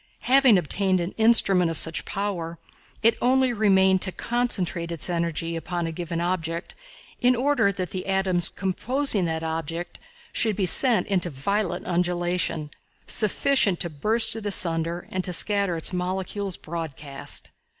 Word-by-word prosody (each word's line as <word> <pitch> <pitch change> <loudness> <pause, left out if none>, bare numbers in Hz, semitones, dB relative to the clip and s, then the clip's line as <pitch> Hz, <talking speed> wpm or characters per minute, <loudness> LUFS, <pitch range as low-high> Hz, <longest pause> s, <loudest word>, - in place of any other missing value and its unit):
Having 260 -4 +5
obtained 185 +2 +1
an 175 +2 -3
instrument 195 -6 +4
of 165 - -3
such 160 +2 +1
power, 180 -5 -4 0.5
it 230 0 +4
only 260 0 +2
remained 190 -3 +3
to 185 - -3
concentrate 185 -8 -2
its 170 +2 0
energy 170 -1 -2
upon 170 +1 -4
a 165 - -3
given 170 0 -5
object 170 -1 -3 0.5
in 250 +1 +3
order 250 -5 +1
that 185 -3 -5
the 185 0 -5
atoms 190 -2 +2
composing 210 +3 +1
that 160 -1 -3
object 165 +1 -5 0.3
should 220 -3 +1
be 195 -1 0
set 240 +6 +4
into 185 -4 -1
violent 175 +5 -2
undulation, 175 -3 -1 0.3
sufficient 215 -2 +2
to 170 - -3
burst 220 +10 +2
it 220 -2 -5
asunder 170 -3 +1
and 185 0 -2
to 180 - -2
scatter 200 0 +1
its 165 - +3
molecules 190 +1 -3
broadcast. 150 -4 -6
185 Hz, 145 wpm, -24 LUFS, 170-205 Hz, 0.5 s, Having